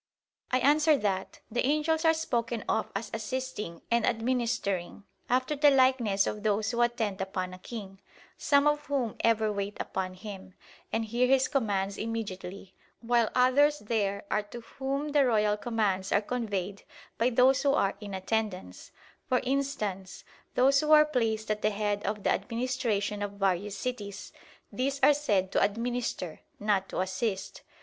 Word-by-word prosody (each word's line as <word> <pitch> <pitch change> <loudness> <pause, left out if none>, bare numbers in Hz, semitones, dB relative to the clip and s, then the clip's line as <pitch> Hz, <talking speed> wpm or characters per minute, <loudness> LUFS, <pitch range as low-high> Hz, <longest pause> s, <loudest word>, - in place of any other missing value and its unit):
I 255 - +2
answer 300 +2 +4
that, 195 -5 -2
The 245 - 0
angels 305 +3 +1
are 320 - +6
spoken 235 -7 -2
of 220 - 0
as 210 +2 -4
"assisting" 220 -6 -4
and 235 -1 +3
"administering," 225 -6 -1 0.3
after 255 +4 +1
the 295 +1 +6
likeness 255 -7 +3
of 210 - -3
those 215 +1 +1
who 240 0 0
attend 225 -5 0
upon 185 -1 -3
a 185 - -10
king; 195 -3 -8 0.3
some 280 0 +3
of 295 0 +1
whom 260 -6 -1
ever 220 -2 +2
wait 200 0 -4
upon 185 -1 -3
him, 190 -1 -9 0.4
and 225 - 0
hear 240 +3 +1
his 265 0 +4
commands 200 -8 -1
immediately; 200 -4 -5 0.3
while 235 -1 +2
others 280 +4 +4
there 205 -4 -1
are 210 - +2
to 225 +3 -10
whom 275 +5 -3
the 290 -1 +4
royal 215 -4 +2
commands 210 -4 -1
are 200 - +4
conveyed 205 -4 -3 0.4
by 235 +2 +3
those 255 +2 +4
who 280 -1 +3
are 195 -8 +1
in 200 -2 -6
attendance 195 0 -3 0.4
for 255 -4 +2
instance, 250 -9 -2 0.3
those 275 +2 +5
who 305 +1 0
are 305 0 +8
placed 225 -7 -1
at 210 0 -2
the 215 - +3
head 205 -1 -1
of 205 -1 -3
the - - +2
administration 230 -4 -1
of 205 0 -3
various 195 0 -1
cities; 205 -6 -5 0.4
these 275 +2 -1
are 295 - +8
said 205 -11 0
to - - +2
administer, 225 -5 -2 0.2
not 205 -2 0
to - - -2
assist. 190 +2 -3
225 Hz, 160 wpm, -29 LUFS, 200-255 Hz, 0.4 s, are